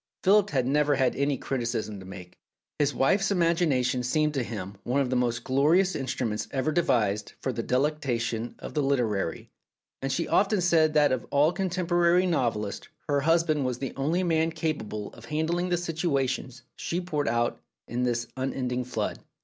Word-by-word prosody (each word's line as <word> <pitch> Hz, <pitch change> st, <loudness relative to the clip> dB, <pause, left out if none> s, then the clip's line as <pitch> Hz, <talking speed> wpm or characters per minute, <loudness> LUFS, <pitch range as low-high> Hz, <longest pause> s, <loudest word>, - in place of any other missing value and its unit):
Philip 205 Hz, +1 st, +5 dB
had 130 Hz, -6 st, 0 dB
never 145 Hz, +2 st, +2 dB
any 135 Hz, +1 st, +1 dB
criticism 120 Hz, -6 st, -3 dB
to 95 Hz, -, -11 dB
make: 90 Hz, -2 st, -11 dB, 0.4 s
his 145 Hz, -1 st, +3 dB
wife's 190 Hz, +10 st, +2 dB
imagination 165 Hz, -9 st, +2 dB
seemed 150 Hz, +5 st, +1 dB
to 135 Hz, -, 0 dB
him 100 Hz, -4 st, -6 dB
one 130 Hz, +3 st, 0 dB
of 130 Hz, -2 st, 0 dB
the -, -, +1 dB
most 120 Hz, -2 st, 0 dB
glorious 155 Hz, +9 st, +3 dB
instruments 120 Hz, -5 st, -2 dB
ever 135 Hz, +3 st, -1 dB
devised 110 Hz, -, +1 dB
for 130 Hz, -, -2 dB
the 115 Hz, -, -2 dB
delectation 125 Hz, -4 st, -1 dB
of -, -, -8 dB
the 150 Hz, -, +1 dB
literary, 115 Hz, -, -1 dB, 0.5 s
and 135 Hz, 0 st, -2 dB
she 130 Hz, -, -1 dB
often 205 Hz, 0 st, +3 dB
said 160 Hz, -3 st, +3 dB
that 150 Hz, -1 st, +5 dB
of 130 Hz, -3 st, -2 dB
all 145 Hz, +3 st, +4 dB
contemporary 180 Hz, -1 st, +2 dB
novelists 115 Hz, -, -1 dB, 0.2 s
her 145 Hz, -1 st, +1 dB
husband 165 Hz, -1 st, +2 dB
was 125 Hz, -2 st, -1 dB
the 135 Hz, 0 st, -4 dB
only 155 Hz, +7 st, 0 dB
man 165 Hz, -2 st, +2 dB
capable 130 Hz, -11 st, -4 dB
of -, -, -13 dB
handling 165 Hz, +4 st, -1 dB
the 175 Hz, -, +2 dB
situations 140 Hz, -6 st, -2 dB
she 170 Hz, -, -2 dB
poured 155 Hz, -5 st, -2 dB
out 120 Hz, 0 st, 0 dB, 0.3 s
in 120 Hz, +2 st, -2 dB
this 120 Hz, -1 st, 0 dB
unending 130 Hz, -1 st, -2 dB
flood. 125 Hz, -, -3 dB
140 Hz, 165 wpm, -27 LUFS, 120-165 Hz, 0.5 s, Philip